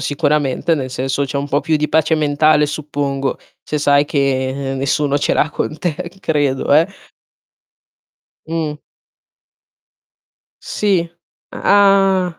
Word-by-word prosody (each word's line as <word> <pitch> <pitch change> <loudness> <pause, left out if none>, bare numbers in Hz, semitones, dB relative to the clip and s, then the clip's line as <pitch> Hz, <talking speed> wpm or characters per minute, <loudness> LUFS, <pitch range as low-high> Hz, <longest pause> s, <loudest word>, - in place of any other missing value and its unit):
sicuramente 145 +2 0
nel 130 -4 -4
senso 135 +2 -2
c'è 140 - -3
un 140 +1 -4
po' 145 +1 +1
più 160 -1 +1
di 150 0 -1
pace 160 0 +2
mentale, 150 0 +3
suppongo, 140 -2 -3 0.2
se 150 - -3
sai 145 0 +3
che 135 -1 -1
nessuno 140 +1 0
ce 145 - 0
l'ha 155 - +2
con 155 -1 -4
te, 175 -4 -1 0.3
credo, 145 -4 +1
eh. 160 +2 +5 1.6
Mh. 160 -2 -3 1.8
Sì. 190 -5 0 0.4
Ah. 195 -3 +3
150 Hz, 115 wpm, -17 LUFS, 140-160 Hz, 1.8 s, eh